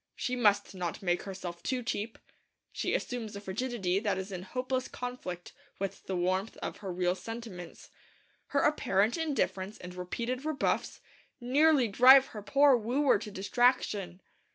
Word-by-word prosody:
She 250 Hz, -, -2 dB
must 205 Hz, -5 st, +2 dB
not 180 Hz, -1 st, -4 dB
make 175 Hz, -1 st, +1 dB
herself 185 Hz, -3 st, -7 dB
too 255 Hz, +4 st, -2 dB
cheap. 220 Hz, 0 st, -3 dB, 0.5 s
She -, -, -1 dB
assumes 230 Hz, -4 st, -4 dB
a -, -, -5 dB
frigidity 200 Hz, -2 st, -1 dB
that 205 Hz, -3 st, 0 dB
is 190 Hz, +1 st, -5 dB
in 185 Hz, -2 st, -5 dB
hopeless 255 Hz, +6 st, -2 dB
conflict 245 Hz, -9 st, -6 dB, 0.2 s
with 195 Hz, -1 st, -5 dB
the 190 Hz, -, -2 dB
warmth 185 Hz, +4 st, -1 dB
of -, -, -5 dB
her 195 Hz, -3 st, -6 dB
real 180 Hz, 0 st, +1 dB
sentiments. 190 Hz, -3 st, -8 dB, 0.6 s
Her 280 Hz, -, +1 dB
apparent 225 Hz, -7 st, +2 dB
indifference 220 Hz, -, -1 dB
and 180 Hz, 0 st, -9 dB
repeated 235 Hz, +8 st, -4 dB
rebuffs 310 Hz, -2 st, -1 dB, 0.4 s
nearly 275 Hz, +1 st, +4 dB
drive 260 Hz, +6 st, +8 dB
her 210 Hz, -, -6 dB
poor 275 Hz, +6 st, +5 dB
wooer 250 Hz, +5 st, +2 dB
to 215 Hz, -, -7 dB
distraction. 200 Hz, -3 st, +1 dB
210 Hz, 150 wpm, -30 LUFS, 185-250 Hz, 0.6 s, drive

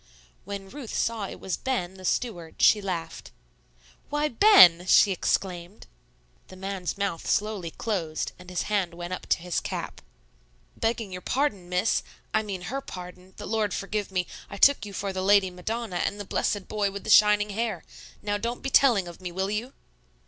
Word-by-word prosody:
When 200 Hz, 0 st, -6 dB
Ruth 255 Hz, +1 st, -8 dB
saw 225 Hz, -3 st, -1 dB
it -, -, -9 dB
was 190 Hz, -, -3 dB
Ben, 240 Hz, -9 st, -2 dB
the 190 Hz, -1 st, -11 dB
steward, 175 Hz, -8 st, -2 dB
she 210 Hz, -, +6 dB
laughed. 170 Hz, -4 st, -5 dB, 0.8 s
"Why, 295 Hz, +1 st, 0 dB
Ben!" 185 Hz, -, +7 dB
she 200 Hz, -, +6 dB
exclaimed. 180 Hz, +1 st, -2 dB, 0.6 s
The -, -, -12 dB
man's 190 Hz, -1 st, -4 dB
mouth 200 Hz, -5 st, -2 dB
slowly 205 Hz, -5 st, 0 dB
closed, 165 Hz, -5 st, -3 dB
and 180 Hz, 0 st, -12 dB
his 180 Hz, -, -2 dB
hand 190 Hz, -5 st, -1 dB
went 175 Hz, +1 st, -5 dB
up -, -, -6 dB
to -, -, +3 dB
his 175 Hz, 0 st, -2 dB
cap. -, -, -5 dB, 0.7 s
"Begging 225 Hz, -3 st, -1 dB
your 180 Hz, 0 st, -6 dB
pardon, 205 Hz, -8 st, -1 dB
Miss, 180 Hz, +4 st, +1 dB, 0.3 s
I 220 Hz, -, +3 dB
mean 195 Hz, -4 st, -5 dB
Her 270 Hz, +9 st, -3 dB
pardon, 180 Hz, -3 st, -10 dB
the -, -, -7 dB
Lord 215 Hz, -3 st, 0 dB
forgive 205 Hz, 0 st, -3 dB
me, 180 Hz, -1 st, 0 dB, 0.2 s
I -, -, -7 dB
took 275 Hz, -1 st, +5 dB
you 200 Hz, -, -9 dB
for 195 Hz, 0 st, -3 dB
the 190 Hz, -, -2 dB
Lady 195 Hz, -1 st, +4 dB
Madonna 215 Hz, +2 st, -4 dB
and 200 Hz, +3 st, -1 dB
the 205 Hz, -, -5 dB
blessed 200 Hz, 0 st, -1 dB
Boy 210 Hz, -2 st, 0 dB
with 200 Hz, 0 st, -7 dB
the -, -, -1 dB
shining 210 Hz, +1 st, +6 dB
hair. 215 Hz, -4 st, -2 dB, 0.4 s
Now, 205 Hz, 0 st, -1 dB
don't 235 Hz, +3 st, -4 dB
be 270 Hz, -, -3 dB
telling 235 Hz, -11 st, +5 dB
of 175 Hz, +1 st, -11 dB
me, 180 Hz, -1 st, -5 dB
will 190 Hz, +3 st, -2 dB
you?" 225 Hz, +5 st, -3 dB
200 Hz, 185 wpm, -26 LUFS, 180-215 Hz, 0.8 s, Ben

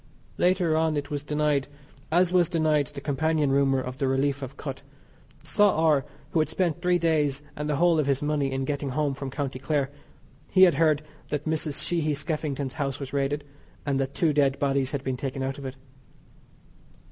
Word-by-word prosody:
Later 180 Hz, -3 st, +3 dB
on 160 Hz, -1 st, +1 dB
it 145 Hz, 0 st, -4 dB
was 145 Hz, -1 st, -2 dB
denied, 150 Hz, -1 st, 0 dB, 0.4 s
as 175 Hz, +2 st, +3 dB
was 175 Hz, -3 st, +4 dB
denied 155 Hz, -4 st, +2 dB
the 140 Hz, +1 st, -8 dB
companion 150 Hz, 0 st, +1 dB
rumour 135 Hz, -1 st, +3 dB
of 130 Hz, +1 st, -6 dB
the 135 Hz, -, +1 dB
relief 135 Hz, +1 st, +1 dB
of 135 Hz, +1 st, -7 dB
Kut. 135 Hz, -3 st, -6 dB, 0.6 s
Saw 195 Hz, +7 st, +3 dB
R. 155 Hz, -4 st, +3 dB, 0.3 s
who 165 Hz, -, +2 dB
had 155 Hz, -, +1 dB
spent 175 Hz, -5 st, -1 dB
three 180 Hz, -1 st, +3 dB
days 150 Hz, -4 st, +1 dB
and 150 Hz, 0 st, -3 dB
the 150 Hz, -, +1 dB
whole 170 Hz, +1 st, +4 dB
of 145 Hz, -, +1 dB
his 135 Hz, -1 st, +2 dB
money 145 Hz, -2 st, 0 dB
in 135 Hz, 0 st, -1 dB
getting 140 Hz, 0 st, -2 dB
home 145 Hz, +1 st, 0 dB
from 135 Hz, 0 st, -5 dB
County 135 Hz, -2 st, -4 dB
Clare. 140 Hz, 0 st, 0 dB, 0.6 s
He 185 Hz, -, +6 dB
had 180 Hz, -3 st, +7 dB
heard 155 Hz, 0 st, +2 dB, 0.2 s
that 150 Hz, 0 st, -3 dB
Mrs. 155 Hz, -2 st, -1 dB
Sheehy 155 Hz, -4 st, 0 dB
Skeffington's 145 Hz, -3 st, -2 dB
house 140 Hz, -3 st, -3 dB
was 140 Hz, -1 st, -7 dB
raided, 140 Hz, +1 st, 0 dB, 0.4 s
and 140 Hz, -2 st, 0 dB
that 135 Hz, 0 st, -2 dB
two 160 Hz, -3 st, +2 dB
dead 140 Hz, -2 st, +3 dB
bodies 135 Hz, -1 st, 0 dB
had 140 Hz, -2 st, -3 dB
been 130 Hz, -2 st, -2 dB
taken 135 Hz, +1 st, -3 dB
out 135 Hz, +1 st, -3 dB
of 140 Hz, -, -8 dB
it. 130 Hz, 0 st, -5 dB
145 Hz, 195 wpm, -26 LUFS, 135-155 Hz, 0.6 s, had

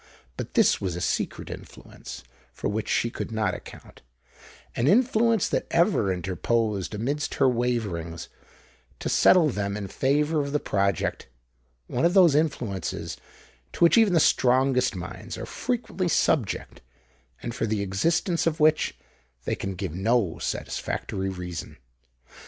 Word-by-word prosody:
But -, -, -7 dB
this -, -, +4 dB
was 90 Hz, -4 st, -2 dB
a -, -, -4 dB
secret 90 Hz, -, -2 dB
influence -, -, -10 dB, 0.3 s
for -, -, -4 dB
which 110 Hz, +1 st, -3 dB
she 115 Hz, -, +1 dB
could -, -, -5 dB
not 110 Hz, -4 st, 0 dB
account,—an 65 Hz, -, -9 dB
influence 230 Hz, -, +3 dB
that -, -, -1 dB
ever 170 Hz, -, +2 dB
interposed 95 Hz, +3 st, -1 dB
amidst 140 Hz, +8 st, -2 dB
her 135 Hz, -, +4 dB
waverings, 110 Hz, -10 st, -2 dB, 0.7 s
to -, -, -4 dB
settle 170 Hz, -4 st, +5 dB
them 100 Hz, -4 st, -2 dB
in 100 Hz, -2 st, -5 dB
favour 150 Hz, -, +1 dB
of 140 Hz, 0 st, -4 dB
the 150 Hz, -, +2 dB
project,—one 60 Hz, -, -3 dB
of 175 Hz, +3 st, +3 dB
those 180 Hz, -6 st, +7 dB
influences 135 Hz, -10 st, -2 dB, 0.6 s
to -, -, 0 dB
which 170 Hz, -, +6 dB
even 220 Hz, -5 st, +5 dB
the 165 Hz, -, +5 dB
strongest 130 Hz, -4 st, +3 dB
minds 85 Hz, -2 st, -7 dB
are -, -, -5 dB
frequently 235 Hz, -7 st, -2 dB
subject, 125 Hz, -, 0 dB, 0.6 s
and 120 Hz, -, -4 dB
for 115 Hz, -, -2 dB
the 105 Hz, -1 st, -1 dB
existence 165 Hz, -, 0 dB
of 160 Hz, -1 st, 0 dB
which 155 Hz, 0 st, +3 dB, 0.5 s
they -, -, 0 dB
can 95 Hz, 0 st, -4 dB
give 90 Hz, -3 st, -4 dB
no 100 Hz, -1 st, +1 dB
satisfactory 95 Hz, 0 st, -3 dB
reason. 90 Hz, -3 st, -6 dB
115 Hz, 135 wpm, -26 LUFS, 95-150 Hz, 0.7 s, those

